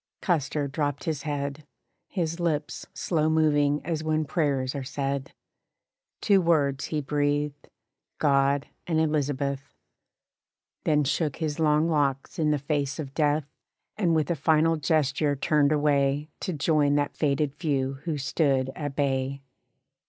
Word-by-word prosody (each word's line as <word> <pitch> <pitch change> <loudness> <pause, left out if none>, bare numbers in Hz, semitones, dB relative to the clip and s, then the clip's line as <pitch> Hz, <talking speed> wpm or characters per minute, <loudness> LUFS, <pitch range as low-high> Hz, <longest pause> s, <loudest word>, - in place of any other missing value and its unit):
Custer 150 -4 0
dropped 145 0 -2
his 155 -3 -2
head, 145 0 -3 0.4
His 170 -3 -2
lips 155 -3 -2
slow 155 -3 0
moving 150 -2 +2
as 160 -1 -2
when 155 0 0
prayers 140 -4 0
are 140 - -4
said 140 0 -3 0.9
Two 200 -3 +4
words 140 -5 +2
he 155 -1 -2
breathed 145 0 -1 0.5
"God 140 -1 +2 0.2
and 160 -2 +1
Elizabeth," 145 -3 -1 1.1
Then 150 -1 +3
shook 145 +1 0
his 155 -1 -3
long 155 0 +3
locks 145 0 0
in 155 -1 +2
the 150 - +2
face 140 0 -2
of 140 -4 -6
death, 150 -1 +1 0.5
And 175 -6 +2
with 155 +2 +1
a - - +1
final 160 +2 +3
gesture 145 -1 +1
turned 145 +1 +2
away 145 0 +1
To - - -3
join 150 -2 +2
that 145 -1 0
fated 140 -1 0
few 135 -4 -1
who 160 -3 -1
stood 135 -1 +1
at 145 -2 -4
bay. 135 -1 -1
145 Hz, 135 wpm, -26 LUFS, 140-155 Hz, 1.1 s, Two